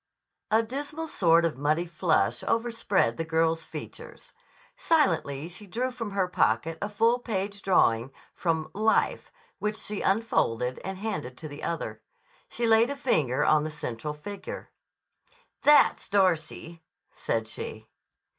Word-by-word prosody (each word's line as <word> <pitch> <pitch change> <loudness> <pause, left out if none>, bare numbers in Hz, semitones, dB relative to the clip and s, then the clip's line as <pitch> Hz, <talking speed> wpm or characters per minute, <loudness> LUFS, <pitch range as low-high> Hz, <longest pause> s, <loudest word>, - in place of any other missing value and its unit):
A 220 +1 +4
dismal 290 +7 -5
sort 170 - +4
of 155 -5 -2
muddy 155 +4 +1
flush 165 0 +1
overspread 230 -3 +1
the 165 - -1
girl's 165 0 +1
features. - - -9 0.4
Silently 270 - +1
she 180 +4 -10
drew 245 +7 -2
from 230 -3 -5
her 195 -2 0
pocket 165 -2 +1
a 205 - -2
full 230 +4 +2
page 200 -3 -3
drawing 125 -10 +3 0.2
from 160 -2 -1
"Life" 220 +3 +1 0.3
which 210 +1 -2
she 210 -1 -4
unfolded 130 - +1
and 190 0 -5
handed 150 - -4
to 160 - -7
the 145 0 -9
other. 170 - -4 0.5
She 235 - -2
laid 225 +2 +5
a 280 - -3
finger 155 - +1
on 155 -1 +4
the 155 - -3
central 150 -1 -5
figure. 200 +6 -8 0.9
"That's 295 -1 +5
Darcy," 170 -3 0 0.3
said 115 -1 -2
she. 110 0 -5
185 Hz, 135 wpm, -27 LUFS, 155-225 Hz, 0.9 s, laid